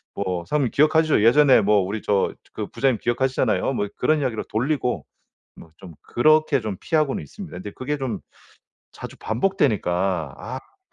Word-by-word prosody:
뭐 90 Hz, -3 st, -3 dB
사장님 145 Hz, -5 st, 0 dB
기억하시죠? 155 Hz, -4 st, +3 dB
예전에 130 Hz, +1 st, +6 dB
뭐 105 Hz, +1 st, +3 dB
우리 100 Hz, +3 st, -3 dB
저 100 Hz, -2 st, +1 dB, 0.2 s
그 -, -, -4 dB
부장님 130 Hz, -5 st, 0 dB
기억하시잖아요." 130 Hz, +2 st, 0 dB
뭐 105 Hz, -5 st, -1 dB
그런 155 Hz, +4 st, +2 dB
이야기로 120 Hz, -5 st, -2 dB
돌리고 125 Hz, +2 st, -1 dB, 0.5 s
뭐 80 Hz, -, -14 dB
좀 90 Hz, -4 st, -12 dB
그렇게 155 Hz, +1 st, +3 dB
좀 110 Hz, -3 st, -4 dB
피하고는 155 Hz, -4 st, 0 dB
있습니다. 195 Hz, -, -10 dB
근데 95 Hz, +3 st, -7 dB
그게 145 Hz, +3 st, -3 dB
좀 130 Hz, -4 st, -3 dB, 0.7 s
자주 -, -, -9 dB
반복되니까 95 Hz, -, 0 dB
'아 130 Hz, +3 st, -6 dB
근데 395 Hz, -, -34 dB
125 Hz, 365 characters per minute, -23 LUFS, 105-150 Hz, 0.7 s, 예전에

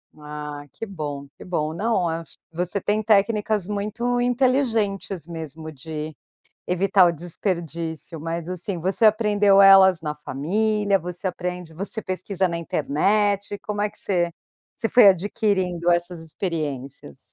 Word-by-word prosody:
Ah, 150 Hz, -1 st, -7 dB
que -, -, -6 dB
bom, 145 Hz, -8 st, -6 dB
que -, -, -11 dB
bom. 155 Hz, -4 st, -2 dB
Não, 195 Hz, 0 st, 0 dB
ach 165 Hz, -2 st, -5 dB
você 180 Hz, +4 st, -2 dB
tem 210 Hz, +2 st, 0 dB
técnicas 210 Hz, -1 st, +2 dB
muito 215 Hz, +4 st, -1 dB
inteligentes, 230 Hz, -, 0 dB
mesmo, 160 Hz, -1 st, -7 dB
de 155 Hz, +1 st, -7 dB, 0.5 s
evitar 190 Hz, +1 st, +4 dB
o 175 Hz, -, +4 dB
desperdício. 170 Hz, -1 st, -4 dB
Mas, 165 Hz, +1 st, -4 dB
assim, 185 Hz, +1 st, -2 dB
você 190 Hz, +7 st, +1 dB
aprendeu 210 Hz, -2 st, +5 dB
elas 190 Hz, -3 st, +7 dB
na 150 Hz, -2 st, -3 dB
família? 200 Hz, +8 st, 0 dB
Você 180 Hz, +2 st, -5 dB
aprende 180 Hz, -2 st, -5 dB
você 200 Hz, +6 st, -4 dB
pesquisa 185 Hz, 0 st, -1 dB
na 170 Hz, -1 st, -3 dB
internet, 200 Hz, +7 st, 0 dB
como 210 Hz, -1 st, -4 dB
é 210 Hz, -, +1 dB
que 215 Hz, -, -16 dB
você 175 Hz, -3 st, 0 dB, 0.4 s
você 225 Hz, -, -1 dB
foi 235 Hz, -3 st, +8 dB
adquirindo 185 Hz, -2 st, +1 dB
essas 175 Hz, -1 st, -1 dB
experiências? 145 Hz, -, -5 dB
180 Hz, 135 wpm, -23 LUFS, 160-205 Hz, 0.5 s, foi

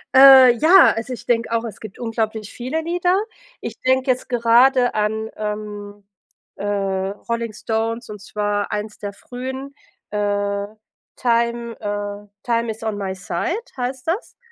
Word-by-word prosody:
Äh, 265 Hz, -2 st, +10 dB
ja, 345 Hz, +3 st, +7 dB
also, 225 Hz, +3 st, -4 dB
ich 245 Hz, -, -9 dB
denke 230 Hz, -1 st, 0 dB
auch, 230 Hz, 0 st, 0 dB
es 225 Hz, -, -7 dB
gibt 215 Hz, -3 st, -10 dB
unglaublich 220 Hz, -2 st, -3 dB
viele 260 Hz, +7 st, -3 dB
Lieder. 355 Hz, +3 st, +1 dB, 0.4 s
Ich -, -, -7 dB
denke 260 Hz, +1 st, +2 dB
jetzt 255 Hz, -, -3 dB
gerade 245 Hz, +1 st, +4 dB
an, 220 Hz, +1 st, -1 dB
ähm, 210 Hz, -1 st, -6 dB, 0.5 s
äh, -, -, -8 dB
Rolling 205 Hz, +3 st, -2 dB
Stones, 225 Hz, +2 st, -2 dB
und 210 Hz, -2 st, -8 dB
zwar 205 Hz, 0 st, -2 dB
eins 210 Hz, 0 st, -4 dB
der 205 Hz, -1 st, -5 dB
frühen, 260 Hz, +5 st, -7 dB, 0.4 s
äh, 205 Hz, -1 st, -1 dB, 0.5 s
„Time” 235 Hz, -1 st, 0 dB
äh, 205 Hz, 0 st, -4 dB, 0.2 s
„Time 235 Hz, -1 st, 0 dB
is 220 Hz, +1 st, -9 dB
on 220 Hz, -2 st, -2 dB
my 195 Hz, -2 st, -3 dB
Side” 345 Hz, -, -2 dB, 0.2 s
heißt 255 Hz, +1 st, -4 dB
das. 365 Hz, +8 st, -2 dB
230 Hz, 145 wpm, -21 LUFS, 205-255 Hz, 0.5 s, Äh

